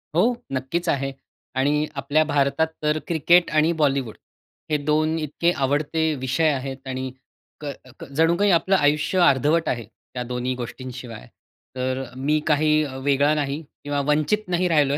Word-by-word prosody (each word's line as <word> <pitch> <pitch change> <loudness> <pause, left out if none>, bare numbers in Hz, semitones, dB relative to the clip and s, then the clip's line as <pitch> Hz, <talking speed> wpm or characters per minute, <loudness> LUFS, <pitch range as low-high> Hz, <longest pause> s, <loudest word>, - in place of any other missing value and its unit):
हो, 225 +9 +4 0.2
नक्कीच 135 +6 -2
आहे. 135 0 0 0.4
आणि 145 +3 +2
आपल्या 145 +3 +2
भारतात 145 0 +1 0.2
तर 150 0 +2
क्रिकेट 170 +2 +4
आणि 155 +2 +3
बॉलिवूड, 135 -6 +1 0.6
हे 150 - +3
2 155 +1 +2
इतके 155 +3 0
आवडते 150 +2 0
विषय 135 +5 +2
आहेत 135 -1 -5
आणि 130 0 -4 0.5
क - - -7 0.3
क - - -7
जणू 165 +3 +4
काही 205 +1 +3
आपलं 185 +3 +3
आयुष्य 150 +2 +2
अर्धवट 145 +5 +2
आहे, 120 -3 -2 0.3
त्या 125 - -3
दोन्ही 125 +1 -1
गोष्टींशिवाय. 125 - -8 0.5
तर 130 +1 -2
मी 150 +3 +1
काही 155 0 +3 0.2
वेगळा 140 +1 +3
नाही 145 +1 -2 0.2
किंवा 145 0 -1
वंचित 155 +8 +2
नाही 180 0 +1
राहिलोय. 145 -4 +3
145 Hz, 150 wpm, -23 LUFS, 135-160 Hz, 0.6 s, हो